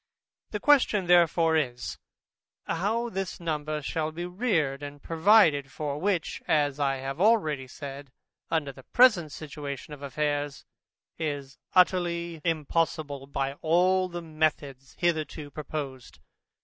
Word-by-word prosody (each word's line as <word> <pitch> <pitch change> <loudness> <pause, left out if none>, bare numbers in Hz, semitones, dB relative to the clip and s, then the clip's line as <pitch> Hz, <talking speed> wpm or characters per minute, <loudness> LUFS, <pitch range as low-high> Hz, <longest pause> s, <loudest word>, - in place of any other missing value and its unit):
The 210 - -3
question 250 -8 +4
therefore 170 -2 +4
is, 125 -6 -2 0.7
How 215 +8 -1
this 195 -2 -4
number 155 -2 -3
shall 155 +2 -2
be 170 +2 -5
reared 175 - 0
and 145 0 -7
provided 160 -5 +4
for? 145 -1 -4
which, 185 -3 -1
as 145 -2 +2
I 140 -1 +1
have 135 +4 -5
already 160 - +3
said, 140 +1 -8 0.4
under 160 -4 0
the 130 - -14
present 190 - +4
situation 145 -1 -7
of 145 - -10
affairs, 145 0 -2 0.5
is 140 -4 -4 0.2
utterly 170 -3 +2
impossible 155 -3 -1
by 135 -1 -2
all 185 +3 +3
the 175 -1 -6
methods 150 -4 -2
hitherto 155 -3 -1
proposed. 140 -4 -6
155 Hz, 125 wpm, -27 LUFS, 140-175 Hz, 0.7 s, question